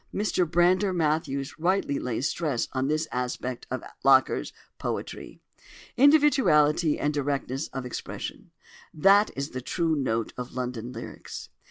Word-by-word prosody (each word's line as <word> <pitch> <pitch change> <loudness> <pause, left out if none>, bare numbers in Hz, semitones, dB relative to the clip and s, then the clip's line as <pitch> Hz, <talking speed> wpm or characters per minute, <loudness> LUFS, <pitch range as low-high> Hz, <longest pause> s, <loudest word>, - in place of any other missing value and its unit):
Mr 190 -4 0
Brander 180 +4 +3
Matthews 155 -4 -1
rightly 175 -4 +1
lays 125 +3 -1
stress 150 -8 -1
on 130 0 0
this 155 +2 0
aspect 125 0 -3
of 130 - -4 0.2
Locker's 135 -1 +4 0.3
poetry; - - -5 0.6
"individuality 195 - +4
and 150 +1 0
directness 140 -1 -2
of 130 -1 -6
expression"—that 195 - -1
is 140 +3 -4
the 130 - -5
true 165 +4 0
note 115 -6 -1
of 125 0 -6
"London 125 -2 -4
Lyrics." 115 -1 -8
145 Hz, 125 wpm, -27 LUFS, 130-175 Hz, 0.6 s, Locker's